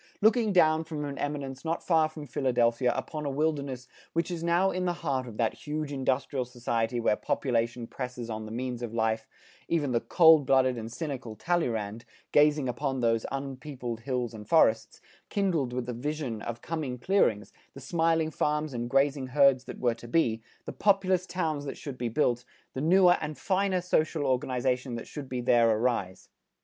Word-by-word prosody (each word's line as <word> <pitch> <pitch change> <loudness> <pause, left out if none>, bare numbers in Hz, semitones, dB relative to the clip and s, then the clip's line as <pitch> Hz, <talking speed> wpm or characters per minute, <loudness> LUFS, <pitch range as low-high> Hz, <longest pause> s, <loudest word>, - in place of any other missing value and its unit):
Looking 220 0 +3
down 160 -3 +4
from 155 -2 -5
an 140 -1 -6
eminence 140 -2 -4
not 165 +1 -2
far 160 -3 +3
from 155 -1 -9
Philadelphia 125 -2 +1
upon 155 -1 -4
a 145 - -1
wilderness 140 -3 -2 0.3
which 165 +2 0
is 170 -1 -4
now 175 +3 +3
in 185 0 -2
the 175 - +1
heart 130 -3 0
of 110 -3 -9
that 115 -2 +1
huge 150 0 -4
industrial 135 0 0
society 120 -1 -2
where 115 -2 +2
population 115 0 -1
presses 125 -1 -6
on 110 -1 -5
the - - -8
means 125 +1 -4
of 115 -1 -5
life, 110 0 0 0.4
even 150 -5 0
the 115 -1 +1
cold 160 -5 +6
blooded 130 -1 +4
and 115 -1 -6
cynical 130 -5 -5
Talleyrand, 115 -8 -1 0.3
gazing 145 -2 +4
on 135 +1 -2
those 115 -1 +1
unpeopled 135 -3 -5
hills 125 -1 -2
and 105 -2 -10
forests, - - +3 0.3
kindled 175 -11 0
with 125 0 -3
the 125 - -4
vision 130 -3 -3
of 120 0 -6
coming 155 -6 -3
clearings, 120 - +1 0.2
the - - -8
smiling 160 +2 +1
farms 150 -1 -1
and 120 0 -3
grazing 135 0 +2
herds 135 -1 +4
that - - -8
were 120 -2 +1
to 115 +1 -12
be, 115 -5 +1 0.2
the - - -6
populous 190 -2 +2
towns 160 -5 -2
that 135 - -5
should 140 -3 -7
be 120 -1 -1
built, 120 -1 +1 0.3
the 130 - -3
newer 180 +3 +5
and 150 0 -4
finer 190 -1 +1
social 160 -3 +1
organization 125 -1 0
that 115 - -6
should 140 -4 -8
there 120 -2 +3
arise. 110 -4 -1
135 Hz, 180 wpm, -28 LUFS, 120-155 Hz, 0.4 s, cold